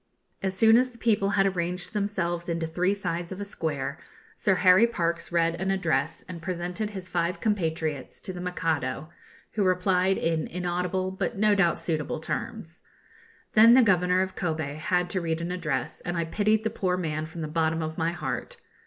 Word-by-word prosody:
As 190 Hz, -1 st, -2 dB
soon 225 Hz, +1 st, +7 dB
as 255 Hz, +1 st, +3 dB
the 240 Hz, -, -17 dB
people 210 Hz, -4 st, +2 dB
had 195 Hz, -, +5 dB
arranged 180 Hz, +1 st, -2 dB
themselves 175 Hz, -5 st, -1 dB
into 165 Hz, -1 st, -1 dB
three 180 Hz, +4 st, 0 dB
sides 175 Hz, -3 st, -3 dB
of 190 Hz, -, -6 dB
a 205 Hz, -, -3 dB
square, 155 Hz, -5 st, -3 dB, 0.4 s
Sir 190 Hz, -, +2 dB
Harry 185 Hz, +5 st, +6 dB
Parkes 170 Hz, -7 st, -2 dB
read 170 Hz, 0 st, +1 dB
an 190 Hz, -, 0 dB
address, 165 Hz, -6 st, 0 dB
and 175 Hz, -2 st, -7 dB
presented 180 Hz, +4 st, -3 dB
his 190 Hz, -3 st, -7 dB
five 175 Hz, 0 st, -1 dB
compatriots 160 Hz, -, -1 dB
to 185 Hz, -, -5 dB
the 180 Hz, -, -6 dB
Mikado, 160 Hz, -5 st, -2 dB, 0.4 s
who 215 Hz, -, -2 dB
replied 185 Hz, 0 st, +2 dB
in 165 Hz, -1 st, 0 dB
inaudible 180 Hz, +1 st, -2 dB
but -, -, -1 dB
no 210 Hz, +1 st, +4 dB
doubt 195 Hz, -4 st, +3 dB
suitable 155 Hz, -3 st, -2 dB
terms. -, -, -5 dB, 0.7 s
Then 230 Hz, +2 st, +8 dB
the 260 Hz, -, +7 dB
Governor 180 Hz, -3 st, +3 dB
of 190 Hz, 0 st, -5 dB
Kobe 160 Hz, -5 st, -2 dB
had 180 Hz, +4 st, 0 dB
to 185 Hz, -, -1 dB
read 165 Hz, -1 st, -1 dB
an 170 Hz, +1 st, -3 dB
address, 180 Hz, 0 st, -2 dB
and 175 Hz, 0 st, -3 dB
I 170 Hz, -, 0 dB
pitied 215 Hz, +5 st, +1 dB
the 220 Hz, -, -1 dB
poor 185 Hz, -4 st, 0 dB
man 155 Hz, -3 st, -2 dB
from 165 Hz, +1 st, -8 dB
the 155 Hz, -, -2 dB
bottom 160 Hz, +1 st, 0 dB
of 160 Hz, +1 st, -5 dB
my 165 Hz, +1 st, +1 dB
heart. -, -, -4 dB
180 Hz, 190 wpm, -27 LUFS, 165-195 Hz, 0.7 s, Then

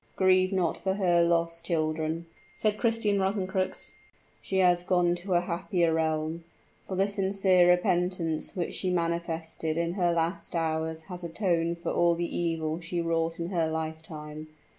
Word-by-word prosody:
"Grieve 185 Hz, 0 st, +4 dB
not 185 Hz, -4 st, 0 dB
for 190 Hz, 0 st, -1 dB
her 175 Hz, -4 st, +3 dB
loss, 170 Hz, 0 st, +1 dB
children," 160 Hz, -1 st, -1 dB, 0.3 s
said 210 Hz, -1 st, 0 dB
Christian 225 Hz, -4 st, +1 dB
Rosencrux; 190 Hz, -1 st, -1 dB, 0.5 s
"she 190 Hz, -, -2 dB
has 180 Hz, -2 st, +4 dB
gone 180 Hz, -1 st, +2 dB
to 180 Hz, +1 st, -2 dB
a 175 Hz, -, +4 dB
happier 175 Hz, -1 st, 0 dB
realm 160 Hz, +1 st, -1 dB, 0.4 s
for 190 Hz, -, -3 dB
the 195 Hz, +2 st, +2 dB
sincere 190 Hz, -2 st, +3 dB
repentance 180 Hz, -2 st, +1 dB
which 175 Hz, -2 st, -2 dB
she 185 Hz, -, -2 dB
manifested 165 Hz, -2 st, -2 dB
in 170 Hz, 0 st, 0 dB
her 175 Hz, -2 st, +2 dB
last 170 Hz, +1 st, -1 dB
hours 160 Hz, 0 st, -1 dB
has 180 Hz, 0 st, -8 dB
atoned 170 Hz, -1 st, 0 dB
for 170 Hz, -, -1 dB
all 170 Hz, 0 st, +3 dB
the 170 Hz, 0 st, -3 dB
evil 165 Hz, -1 st, -1 dB
she 175 Hz, 0 st, -3 dB
wrought 165 Hz, 0 st, 0 dB
in 170 Hz, +1 st, -3 dB
her 170 Hz, -4 st, +1 dB
lifetime. 155 Hz, -1 st, -5 dB
170 Hz, 155 wpm, -28 LUFS, 165-185 Hz, 0.5 s, Grieve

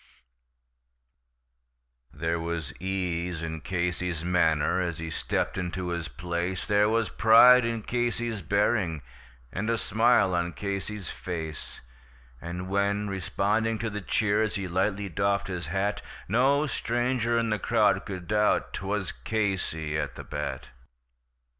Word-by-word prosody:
There 80 Hz, +3 st, -2 dB
was 80 Hz, -4 st, -4 dB
ease 90 Hz, -3 st, -2 dB
in 80 Hz, -1 st, -4 dB
Casey's 90 Hz, -1 st, -2 dB
manner 85 Hz, -2 st, +2 dB
as 85 Hz, -3 st, -2 dB
he 80 Hz, 0 st, -5 dB
stepped -, -, -1 dB
into 90 Hz, 0 st, -3 dB
his 85 Hz, -1 st, -3 dB
place, 85 Hz, +2 st, -3 dB
There 105 Hz, 0 st, +3 dB
was 115 Hz, -1 st, +1 dB
pride 120 Hz, +3 st, +7 dB
in 115 Hz, -2 st, -2 dB
Casey's 120 Hz, -2 st, -1 dB
bearing, 95 Hz, -, +1 dB, 0.5 s
and 110 Hz, +4 st, -2 dB
a 115 Hz, -, +2 dB
smile 110 Hz, -3 st, +3 dB
on 85 Hz, 0 st, 0 dB
Casey's 100 Hz, +2 st, -4 dB
face; 80 Hz, -4 st, -6 dB, 0.6 s
And 90 Hz, +2 st, -5 dB
when, 100 Hz, +1 st, 0 dB
responding 105 Hz, +4 st, 0 dB
to 110 Hz, 0 st, -3 dB
the 105 Hz, 0 st, -4 dB
cheers, 105 Hz, +2 st, +1 dB
he 100 Hz, -2 st, -2 dB
lightly 95 Hz, +3 st, 0 dB
doffed 100 Hz, +1 st, 0 dB
his 90 Hz, -4 st, -4 dB
hat, 95 Hz, +5 st, -1 dB, 0.3 s
No 135 Hz, +7 st, +3 dB
stranger 120 Hz, -2 st, 0 dB
in 115 Hz, -1 st, +1 dB
the 105 Hz, -, 0 dB
crowd -, -, +2 dB
could 95 Hz, -3 st, -6 dB
doubt 105 Hz, 0 st, +2 dB
'twas 95 Hz, 0 st, -2 dB
Casey 90 Hz, -8 st, -2 dB
at 75 Hz, -3 st, -3 dB
the -, -, -7 dB
bat. 70 Hz, -3 st, -5 dB
95 Hz, 130 wpm, -27 LUFS, 85-110 Hz, 0.6 s, pride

